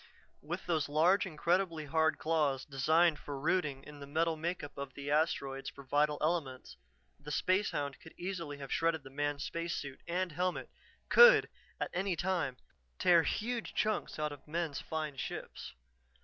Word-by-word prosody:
With 175 Hz, +5 st, -5 dB
those 160 Hz, -5 st, 0 dB
large, 180 Hz, +8 st, +4 dB
incredibly 170 Hz, -1 st, 0 dB
hard 160 Hz, +2 st, +2 dB
claws, 150 Hz, -4 st, 0 dB
designed 155 Hz, +4 st, +3 dB
for 140 Hz, -2 st, -6 dB
rooting 145 Hz, -3 st, 0 dB
in 150 Hz, 0 st, -11 dB
the 140 Hz, -, -9 dB
metal 160 Hz, +3 st, +1 dB
make 170 Hz, +2 st, -3 dB
up 145 Hz, -, -8 dB
of 140 Hz, -1 st, -6 dB
the 140 Hz, 0 st, -4 dB
asteroids 140 Hz, -3 st, 0 dB
for 140 Hz, -, -12 dB
vital 145 Hz, +2 st, +2 dB
elements, 150 Hz, -5 st, -2 dB, 0.4 s
the 145 Hz, +1 st, -10 dB
spacehound 150 Hz, -5 st, 0 dB
could 160 Hz, -, -14 dB
easily 170 Hz, -5 st, -4 dB
have 140 Hz, -2 st, -5 dB
shredded 165 Hz, -3 st, +1 dB
the 135 Hz, -, -11 dB
man's 145 Hz, +1 st, -2 dB
spacesuit 165 Hz, -5 st, -4 dB
and 180 Hz, +1 st, -1 dB
helmet, 180 Hz, +3 st, -2 dB, 0.4 s
could, 480 Hz, +1 st, +8 dB, 0.3 s
at -, -, -2 dB
any 190 Hz, 0 st, 0 dB
time, 170 Hz, -7 st, -1 dB, 0.4 s
tear 175 Hz, -2 st, +5 dB
huge 230 Hz, +7 st, -2 dB
chunks 215 Hz, -1 st, 0 dB
out 150 Hz, -1 st, -1 dB
of 145 Hz, 0 st, -11 dB
men's 160 Hz, -2 st, -2 dB
fine 155 Hz, -3 st, -4 dB
ships. -, -, -6 dB
155 Hz, 160 wpm, -33 LUFS, 145-175 Hz, 0.4 s, could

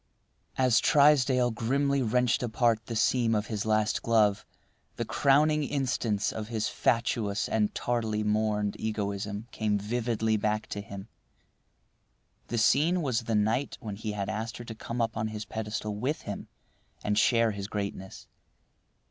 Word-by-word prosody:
As 125 Hz, -3 st, +4 dB
Trysdale 135 Hz, -4 st, +4 dB
grimly 140 Hz, +5 st, 0 dB
wrenched 125 Hz, 0 st, +2 dB
apart 115 Hz, -1 st, +1 dB
the 115 Hz, -, -4 dB
seam 115 Hz, 0 st, +2 dB
of 105 Hz, 0 st, 0 dB
his 105 Hz, +1 st, -2 dB
last 110 Hz, 0 st, +1 dB
glove, 110 Hz, -3 st, +2 dB, 0.5 s
the -, -, -3 dB
crowning 150 Hz, +2 st, +3 dB
instance 120 Hz, -7 st, -1 dB
of 110 Hz, -1 st, -5 dB
his 110 Hz, -2 st, -1 dB
fatuous 115 Hz, -3 st, 0 dB
and 105 Hz, -2 st, +1 dB
tardily 110 Hz, -3 st, -1 dB
mourned 105 Hz, -1 st, 0 dB
egoism 105 Hz, 0 st, -3 dB
came 105 Hz, -2 st, 0 dB
vividly 110 Hz, +1 st, 0 dB
back 105 Hz, +1 st, -1 dB
to 100 Hz, -, -4 dB
him. 100 Hz, 0 st, -9 dB, 1.4 s
The 120 Hz, -, -3 dB
scene 155 Hz, +10 st, +3 dB
was 125 Hz, -5 st, +1 dB
the 115 Hz, -, 0 dB
night 110 Hz, +6 st, 0 dB
when 105 Hz, -3 st, -6 dB
he 105 Hz, +1 st, -4 dB
had 100 Hz, -1 st, -3 dB
asked 110 Hz, +2 st, -4 dB
her 120 Hz, -, -8 dB
to 115 Hz, -, -6 dB
come 115 Hz, +2 st, -4 dB
up 115 Hz, -1 st, -1 dB
on 110 Hz, 0 st, -1 dB
his 110 Hz, 0 st, -5 dB
pedestal 105 Hz, -1 st, -4 dB
with 130 Hz, +9 st, -2 dB
him 100 Hz, -, -6 dB, 0.6 s
and 105 Hz, -, 0 dB
share 115 Hz, +1 st, +3 dB
his 100 Hz, -1 st, -5 dB
greatness. 100 Hz, -2 st, -5 dB
110 Hz, 150 wpm, -28 LUFS, 105-120 Hz, 1.4 s, As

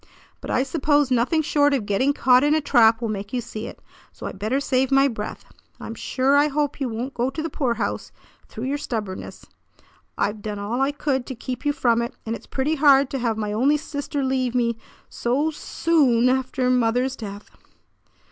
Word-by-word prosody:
But -, -, -8 dB
I 255 Hz, -, +2 dB
suppose 290 Hz, -1 st, +1 dB
nothing 255 Hz, +7 st, +2 dB
short 290 Hz, -1 st, +3 dB
of 235 Hz, -6 st, -2 dB
getting 205 Hz, +8 st, +2 dB
caught 255 Hz, -2 st, +4 dB
in 295 Hz, +1 st, +3 dB
a -, -, +3 dB
trap 235 Hz, -5 st, +4 dB
will 230 Hz, -, -1 dB
make 205 Hz, 0 st, -5 dB
you 250 Hz, -, 0 dB
see 225 Hz, -1 st, -6 dB
it; -, -, -10 dB, 0.3 s
so -, -, -10 dB
I -, -, -3 dB
better 215 Hz, +7 st, -1 dB
save 265 Hz, -2 st, +1 dB
my 275 Hz, +1 st, +5 dB
breath. 215 Hz, -5 st, -6 dB, 0.3 s
I'm 225 Hz, -, -6 dB
sure 260 Hz, +4 st, +1 dB
I 290 Hz, +1 st, +5 dB
hope 290 Hz, 0 st, -2 dB
you 265 Hz, -, 0 dB
won't 240 Hz, +5 st, -4 dB
go 245 Hz, +2 st, 0 dB
to 290 Hz, -, -7 dB
the 325 Hz, -, -4 dB
poorhouse 235 Hz, -7 st, -2 dB, 0.4 s
through 220 Hz, -, -8 dB
your 280 Hz, +3 st, -1 dB
stubbornness. 215 Hz, -8 st, -5 dB, 0.7 s
I've 210 Hz, +1 st, -1 dB
done 210 Hz, 0 st, -4 dB
all 215 Hz, +6 st, -2 dB
I 275 Hz, +1 st, +2 dB
could 275 Hz, -3 st, -2 dB
to 260 Hz, -, -5 dB
keep 250 Hz, +4 st, -5 dB
you -, -, +4 dB
from 235 Hz, -4 st, +2 dB
it, 235 Hz, -, -4 dB
and 225 Hz, +1 st, -2 dB
it's -, -, -12 dB
pretty 275 Hz, +4 st, -1 dB
hard 280 Hz, -2 st, +5 dB
to 270 Hz, -, -2 dB
have 230 Hz, -3 st, -1 dB
my 210 Hz, -1 st, -2 dB
only 270 Hz, +7 st, +3 dB
sister 285 Hz, -1 st, -4 dB
leave 260 Hz, -2 st, 0 dB
me 235 Hz, -2 st, +1 dB, 0.3 s
so 275 Hz, +7 st, 0 dB
soo 320 Hz, +2 st, -5 dB
oo 245 Hz, -4 st, +4 dB
on 245 Hz, +2 st, +4 dB
after 260 Hz, 0 st, 0 dB
mother's 250 Hz, +1 st, +1 dB
death." 205 Hz, -2 st, -9 dB
255 Hz, 205 wpm, -23 LUFS, 230-280 Hz, 0.7 s, my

